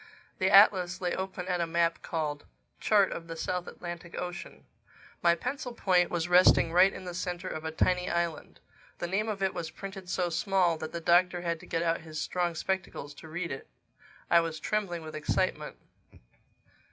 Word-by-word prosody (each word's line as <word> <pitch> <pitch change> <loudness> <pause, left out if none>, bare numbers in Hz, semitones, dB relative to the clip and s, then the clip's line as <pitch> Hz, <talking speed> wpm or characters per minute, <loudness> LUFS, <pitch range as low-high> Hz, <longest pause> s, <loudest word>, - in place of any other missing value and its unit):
The 190 -1 +3
atlas 190 -3 +6
lay 180 -1 -1
open 190 -1 -4
at 180 -1 0
a 170 - 0
map 170 0 +1
called, 150 -3 -3 0.3
Chart 205 -3 +3
of 165 - -6
the 165 - -6
South 180 +2 -3
Atlantic 175 0 -8
Ocean. 180 -1 -7 0.6
My 170 0 +5
pencil 250 - -4
point 180 -5 +3
was 170 -1 -1
resting 180 -2 +6
right 185 +2 +6
in - - -9
the 180 - -5
center 180 +1 -4
of 155 -2 -5
a 160 - -2
tiny 180 +3 +1
island. 170 -2 -2 0.4
The - - -3
name 200 +5 -1
of 195 -2 -3
it 190 - +1
was 170 -2 -4
printed 195 0 -8
so 180 -1 0
small 185 -1 +2
that 155 - -5
the 170 - -5
Doctor 175 +1 +3
had 170 -1 -2
to - - -13
get 165 0 -1
out 165 0 0
his 155 -1 -7
strong 175 -2 -1
spectacles 190 -5 -3
to 160 - -12
read 170 +1 -4
it. 135 - -6 0.6
I 170 - +6
was 165 -1 -2
trembling 190 -6 -2
with 155 0 -8
excitement. 155 - -1
175 Hz, 190 wpm, -29 LUFS, 165-185 Hz, 0.6 s, atlas